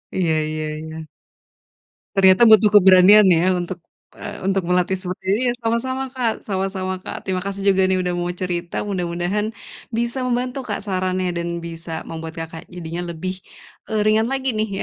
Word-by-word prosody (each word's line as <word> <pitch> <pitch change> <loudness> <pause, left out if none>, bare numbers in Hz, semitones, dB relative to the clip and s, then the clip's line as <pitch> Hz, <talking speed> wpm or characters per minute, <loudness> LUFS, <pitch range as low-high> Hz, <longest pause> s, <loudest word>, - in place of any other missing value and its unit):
Iya 175 -4 +1 0.2
iya 155 0 -3
iya. 160 0 -8 1.2
Ternyata 190 +1 +5
butuh 215 -1 +7
keberanian, 195 +1 +8
ya, 180 +2 +4
untuk, 180 0 -3 0.4
eee, - - -7
untuk 195 -1 0
melatih 180 +2 +1
seperti 185 0 -7 0.2
iya, 245 - +2
sama-sama 260 +4 -1
Kak, 250 -3 -2
sama-sama 190 -1 -3
Kak. 185 - -7
Terima 190 -1 -1
kasih 200 0 -4
juga, 190 -1 +3
nih, 185 0 +1
udah 180 -1 -1
mau 175 0 -2
cerita, 175 -1 -3
mudah-mudahan 190 +2 -2 0.4
bisa 235 +3 -1
membantu 250 +1 -2
Kak, 210 -4 -3
sarannya 185 -2 -1
dan 170 0 -3
bisa 165 -1 -6
membuat 160 0 -6
Kakak 165 0 -8
jadinya 175 0 -6
lebih, 185 +3 -4 0.5
eee, 215 -1 0
ringan 215 +1 +3
lagi, 265 -1 -1
nih, 215 0 0
185 Hz, 160 wpm, -21 LUFS, 175-215 Hz, 1.2 s, keberanian